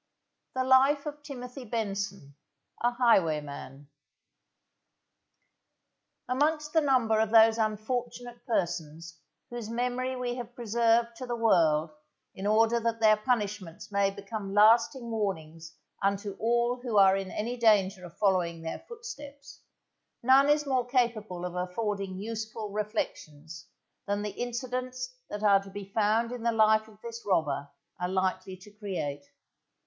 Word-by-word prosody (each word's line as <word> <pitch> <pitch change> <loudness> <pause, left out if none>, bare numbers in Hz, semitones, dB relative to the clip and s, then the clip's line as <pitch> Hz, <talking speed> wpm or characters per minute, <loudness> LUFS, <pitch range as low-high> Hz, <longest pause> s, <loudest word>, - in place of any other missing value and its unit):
The 260 - +1
Life 270 +3 +4
of 295 0 -6
TIMOTHY 255 -2 -8
BENSON, 195 - -4 0.5
a 240 - +3
Highwayman 150 - 0 2.4
Amongst 300 +3 0
the 320 - +4
number 250 -6 +2
of 220 0 +2
those 225 0 +6
unfortunate 240 +3 -3
persons 165 -6 -3 0.3
whose 240 -3 -6
memory 250 +2 -1
we 250 -1 -2
have 240 -1 -7
preserved 235 0 +1
to 255 - -6
the 240 - -2
world 165 -9 +3 0.4
in 195 +2 -4
order 225 +2 +3
that 230 0 -1
their 215 -1 +6
punishments 210 -6 -3
may 200 -1 +2
become 200 0 -6
lasting 230 +3 +4
warnings 165 -7 -4 0.3
unto 200 0 -1
all 240 +2 +1
who 240 -4 -1
are 195 -1 +7
in 195 -1 -3
any 235 +5 -3
danger 205 -5 +3
of 175 -1 -11
following 175 -5 +1
their 160 - -4
footsteps, 435 - -10 0.6
none 270 +3 +6
is 295 0 +3
more 255 -3 0
capable 220 -8 0
of 180 - -5
affording 190 +1 -3
useful 220 0 -5
reflections 160 -7 -5 0.4
than 205 +1 -1
the 210 - -3
incidents 255 +2 -4 0.2
that 210 0 -5
are 200 -2 +5
to 195 - -12
be 200 0 -7
found 220 +3 +1
in 245 -1 -6
the 235 0 +1
life 220 -1 +4
of 215 -1 -18
this 235 0 -7
robber 145 -7 0 0.3
are 180 0 -2
likely 185 0 -1
to 195 +3 -15
create. 180 -9 -5
220 Hz, 135 wpm, -29 LUFS, 195-245 Hz, 2.4 s, are